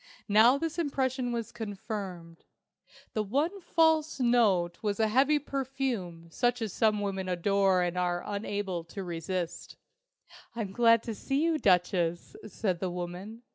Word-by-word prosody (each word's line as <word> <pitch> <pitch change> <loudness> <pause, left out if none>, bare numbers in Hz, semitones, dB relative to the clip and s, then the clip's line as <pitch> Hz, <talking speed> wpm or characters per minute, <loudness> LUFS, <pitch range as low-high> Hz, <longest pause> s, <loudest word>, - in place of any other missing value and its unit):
Now 225 +5 +6
this 330 +3 -3
impression 260 -5 -1
was 230 -2 -3
confirmed. 200 -6 -6 0.7
The 215 - 0
one 295 - -1
false 320 -3 +2
note 215 -9 +2
was 205 -1 -1
a 220 - +3
heavy 265 +7 +3
perfume 260 - -4
such 245 +5 +1
as 220 -5 -3
some 215 -2 +2
women 195 -2 -3
adore 190 +1 +2
and 175 0 -2
are 175 -1 -1
unable 200 -3 -3
to 195 +3 -7
resist. 175 0 -4 0.8
"I'm 215 -5 -3
glad 230 +1 +4
to 230 - -4
see 275 +7 -1
you, 325 -2 +1
Duchess," 180 - +1
said 190 -4 -2
the 185 - -2
woman. 180 +6 -6
210 Hz, 140 wpm, -29 LUFS, 180-245 Hz, 0.8 s, Now